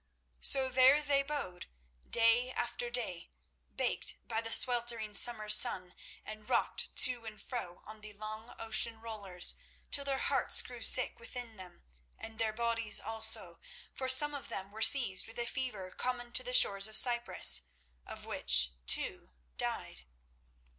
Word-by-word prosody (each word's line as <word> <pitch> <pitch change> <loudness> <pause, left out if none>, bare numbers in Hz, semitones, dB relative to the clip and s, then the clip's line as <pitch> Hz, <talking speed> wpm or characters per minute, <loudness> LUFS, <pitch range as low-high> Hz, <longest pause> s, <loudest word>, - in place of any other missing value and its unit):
So 265 - +2
there 260 +3 +1
they 285 -1 -2
bode 275 -11 -9 0.4
day 235 +2 0
after 240 - -7
day, 220 -8 -5 0.5
baked - - -2
by 225 -1 -4
the 225 0 -6
sweltering 235 -4 +2
summer 215 0 +4
sun 200 -4 +3 0.3
and 215 0 -13
rocked - - -4
to 245 -2 -5
and 215 -1 -12
fro 205 -9 -10
on 215 +1 -15
the 215 0 -9
long 215 +2 -11
ocean 225 0 -2
rollers 205 -6 -5 0.4
till 280 - -1
their 275 -1 -5
hearts 275 0 +2
grew 245 -2 -14
sick 250 +1 +4
within 235 -1 -11
them, 185 - -15 0.3
and 225 0 -13
their 225 -1 -3
bodies 230 -1 -2
also, 225 0 +2 0.3
for 260 -1 -7
some 295 +3 +4
of 285 - -10
them 195 +1 -9
were 220 +1 -13
seized 220 -6 +3
with 225 - -15
a 240 - -5
fever 235 -7 -8
common 245 -1 -6
to 255 - +1
the 250 0 -8
shores 195 -4 +3
of 220 - -3
Cyprus, 240 - +5 0.4
of - - -12
which 60 -1 +1 0.2
two - - -1 0.3
died. 65 - -8
230 Hz, 155 wpm, -29 LUFS, 215-250 Hz, 0.5 s, Cyprus